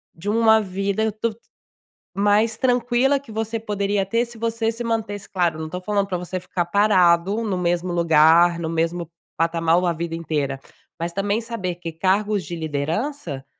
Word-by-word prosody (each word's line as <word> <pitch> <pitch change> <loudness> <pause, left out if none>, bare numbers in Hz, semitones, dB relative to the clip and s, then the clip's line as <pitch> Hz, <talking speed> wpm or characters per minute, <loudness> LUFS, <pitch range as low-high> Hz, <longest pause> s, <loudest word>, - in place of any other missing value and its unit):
De 180 +5 -5
uma 220 0 +5
vida 200 +2 -1
duv 230 -2 0 0.8
mais 210 +3 +2
tranquila, 245 +2 +2
que 270 -4 -14
você 225 +1 -3
poderia 205 -2 -1
ter, 230 +5 0
se 235 -1 -11
você 230 0 -1
se 230 +1 -5
mantesse 220 -3 -3
claro, 175 -4 0
não 160 0 -5
tô 180 - -5
falando 200 +1 -1
pra 185 -2 -2
você 180 +1 -4
ficar 180 -1 -2
parado, 190 +1 +3
no 200 -4 -1
mesmo 175 0 -1
lugar, 170 +1 +5
no 165 - -3
mesmo 165 +1 -1 0.3
patamar 165 +1 +2
a 175 - +1
vida 165 0 -4
inteira. 150 -5 -2 0.4
Mas 170 +1 -3
também 200 +3 0
saber 225 -6 -4
que 170 -1 -6
cargos 195 +4 +1
de 175 - -6
liderança, 160 - -3
190 Hz, 170 wpm, -22 LUFS, 170-220 Hz, 0.8 s, uma